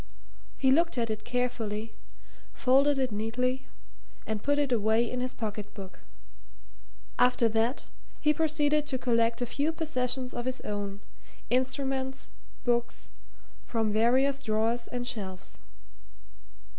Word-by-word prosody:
He 265 Hz, -1 st, +3 dB
looked 335 Hz, +1 st, +3 dB
at 230 Hz, -2 st, 0 dB
it 215 Hz, 0 st, -4 dB
carefully, 230 Hz, -3 st, -2 dB, 0.6 s
folded 275 Hz, +2 st, +4 dB
it 260 Hz, -3 st, 0 dB
neatly, 250 Hz, +5 st, -1 dB, 0.6 s
and 220 Hz, -1 st, -2 dB
put 285 Hz, +4 st, +1 dB
it 285 Hz, -2 st, +1 dB
away 220 Hz, 0 st, +3 dB
in 250 Hz, +2 st, -3 dB
his 255 Hz, 0 st, -2 dB
pocket 210 Hz, -2 st, -5 dB
book; 190 Hz, -2 st, -9 dB, 1.2 s
after 250 Hz, -1 st, +5 dB
that 225 Hz, +4 st, 0 dB, 0.3 s
he 300 Hz, 0 st, +3 dB
proceeded 300 Hz, -1 st, +2 dB
to 260 Hz, -, 0 dB
collect 235 Hz, -1 st, +1 dB
a -, -, 0 dB
few 285 Hz, +6 st, 0 dB
possessions 255 Hz, -5 st, -1 dB
of 240 Hz, -, -4 dB
his 255 Hz, 0 st, -1 dB
own, 205 Hz, -1 st, -4 dB, 0.5 s
instruments, 265 Hz, +1 st, -1 dB, 0.3 s
books 240 Hz, -1 st, -1 dB, 0.5 s
from 225 Hz, -2 st, 0 dB
various 260 Hz, +6 st, +3 dB
drawers 225 Hz, +1 st, 0 dB
and 245 Hz, 0 st, -4 dB
shelves. 195 Hz, -6 st, -6 dB
250 Hz, 125 wpm, -29 LUFS, 225-265 Hz, 1.2 s, after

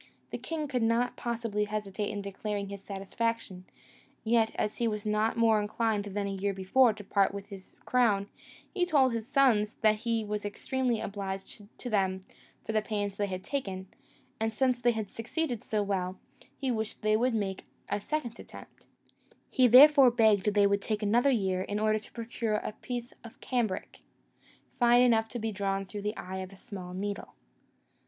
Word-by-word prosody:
The -, -, -4 dB
king 315 Hz, -2 st, -3 dB
could 255 Hz, -3 st, -1 dB
not 230 Hz, +2 st, +1 dB
possibly 230 Hz, -3 st, -2 dB
hesitate 210 Hz, -1 st, -3 dB
in 205 Hz, -1 st, -4 dB
declaring 200 Hz, 0 st, -4 dB
his 200 Hz, -1 st, -8 dB
satisfaction; 195 Hz, -1 st, -3 dB, 0.6 s
yet, 225 Hz, 0 st, +3 dB
as 210 Hz, 0 st, -2 dB
he 235 Hz, -, +1 dB
was 210 Hz, -1 st, -3 dB
not 215 Hz, +2 st, +1 dB
more 225 Hz, -2 st, +4 dB
inclined 210 Hz, 0 st, -1 dB
than 205 Hz, 0 st, -3 dB
the 200 Hz, -, -2 dB
year 195 Hz, +1 st, -1 dB
before 225 Hz, +6 st, +4 dB
to 210 Hz, -1 st, -9 dB
part 200 Hz, 0 st, +1 dB
with 200 Hz, +1 st, -7 dB
his 195 Hz, -2 st, -11 dB
crown, 215 Hz, -6 st, +2 dB, 0.5 s
he 360 Hz, -, +1 dB
told 280 Hz, -8 st, +3 dB
his 225 Hz, -1 st, -3 dB
sons 250 Hz, -7 st, +3 dB
that 215 Hz, -1 st, +4 dB
he 225 Hz, 0 st, -1 dB
was 210 Hz, 0 st, -3 dB
extremely 245 Hz, +3 st, -1 dB
obliged 195 Hz, 0 st, -6 dB
to -, -, -7 dB
them 190 Hz, -2 st, 0 dB, 0.4 s
for -, -, -2 dB
the 215 Hz, 0 st, +2 dB
pains 205 Hz, -2 st, -3 dB
they 205 Hz, -, 0 dB
had 185 Hz, -1 st, -5 dB
taken: 190 Hz, -9 st, -4 dB, 0.5 s
and 225 Hz, 0 st, -1 dB
since 255 Hz, 0 st, +1 dB
they 240 Hz, -, +4 dB
had 220 Hz, -2 st, -3 dB
succeeded 240 Hz, -, -3 dB
so 210 Hz, -2 st, 0 dB
well, 185 Hz, -2 st, -2 dB, 0.4 s
he 265 Hz, -2 st, -1 dB
wished 220 Hz, -2 st, -4 dB
they 215 Hz, 0 st, +3 dB
would 240 Hz, +2 st, +2 dB
make 195 Hz, -3 st, -2 dB, 0.2 s
a 205 Hz, 0 st, -2 dB
second 240 Hz, -2 st, -3 dB
attempt; -, -, -13 dB, 0.6 s
he 255 Hz, -1 st, +5 dB
therefore 275 Hz, +2 st, +9 dB
begged 215 Hz, -4 st, +3 dB
they 205 Hz, -1 st, +5 dB
would 200 Hz, 0 st, +2 dB
take 215 Hz, +1 st, -2 dB
another 235 Hz, +6 st, +3 dB
year 190 Hz, -7 st, +1 dB
in 205 Hz, +2 st, -3 dB
order 215 Hz, 0 st, +2 dB
to 215 Hz, -, -14 dB
procure 230 Hz, -1 st, -3 dB
a 210 Hz, -, -2 dB
piece 245 Hz, -1 st, -5 dB
of 230 Hz, -, -12 dB
cambric, 235 Hz, -7 st, -2 dB, 0.8 s
fine 240 Hz, 0 st, +6 dB
enough 225 Hz, -2 st, +3 dB
to 245 Hz, -, -5 dB
be 225 Hz, -1 st, -2 dB
drawn 195 Hz, -1 st, -2 dB
through 205 Hz, +2 st, -7 dB
the 210 Hz, +2 st, -3 dB
eye 190 Hz, +1 st, -6 dB
of 185 Hz, 0 st, -6 dB
a 195 Hz, -, -14 dB
small 185 Hz, -2 st, -8 dB
needle. 200 Hz, +1 st, -5 dB
215 Hz, 185 wpm, -30 LUFS, 200-235 Hz, 0.8 s, therefore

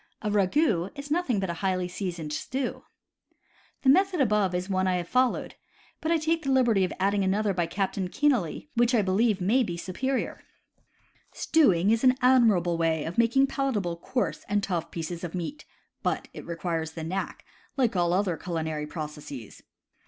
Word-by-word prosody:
A 210 Hz, -, -1 dB
ragout 205 Hz, -, +1 dB
is 285 Hz, +1 st, -7 dB
nothing 305 Hz, -, +1 dB
but 190 Hz, -2 st, -1 dB
a 170 Hz, -, -7 dB
highly 185 Hz, -2 st, 0 dB
seasoned 175 Hz, -4 st, -4 dB
stew. 260 Hz, -, -3 dB, 1.0 s
The 265 Hz, -, +4 dB
method 380 Hz, +7 st, +5 dB
given 290 Hz, -7 st, +3 dB
above 205 Hz, -4 st, +1 dB
is 180 Hz, 0 st, -1 dB
the 195 Hz, -, -4 dB
one 185 Hz, 0 st, +1 dB
I 185 Hz, -, +2 dB
have 175 Hz, -1 st, -3 dB
followed; 255 Hz, +3 st, +1 dB, 0.5 s
but 320 Hz, -, -1 dB
I 335 Hz, -, +4 dB
take 325 Hz, +1 st, 0 dB
the 275 Hz, -, -3 dB
liberty 240 Hz, -7 st, +3 dB
of 185 Hz, -, -1 dB
adding 200 Hz, +1 st, +2 dB
another 200 Hz, +2 st, +1 dB
by 175 Hz, -2 st, 0 dB
Captain 190 Hz, -1 st, -2 dB
Kenealy, 260 Hz, -, 0 dB
which 240 Hz, +1 st, +3 dB
I 215 Hz, -, +3 dB
believe 200 Hz, +2 st, +2 dB
may 215 Hz, +8 st, +3 dB
be 175 Hz, -8 st, -2 dB
superior: 255 Hz, +10 st, -3 dB, 0.9 s
Stewing 205 Hz, -, +3 dB
is 225 Hz, +2 st, +1 dB
an 255 Hz, 0 st, +5 dB
admirable 215 Hz, -10 st, +4 dB
way 160 Hz, -2 st, +1 dB
of 170 Hz, +7 st, -3 dB
making 235 Hz, +4 st, +4 dB
palatable 245 Hz, -11 st, -1 dB
coarse 245 Hz, +9 st, -2 dB
and 205 Hz, 0 st, +1 dB
tough 175 Hz, -5 st, -2 dB
pieces 170 Hz, +1 st, -5 dB
of 175 Hz, 0 st, -5 dB
meat, 180 Hz, -, -5 dB, 0.4 s
but -, -, -2 dB
it -, -, -9 dB
requires 165 Hz, -2 st, -3 dB
the 160 Hz, -, -6 dB
knack, 185 Hz, +4 st, -4 dB, 0.3 s
like 245 Hz, -6 st, +2 dB
all 175 Hz, -1 st, +2 dB
other 180 Hz, -2 st, +1 dB
culinary 160 Hz, -3 st, -3 dB
processes. 150 Hz, -, -8 dB
195 Hz, 180 wpm, -27 LUFS, 175-250 Hz, 1.0 s, method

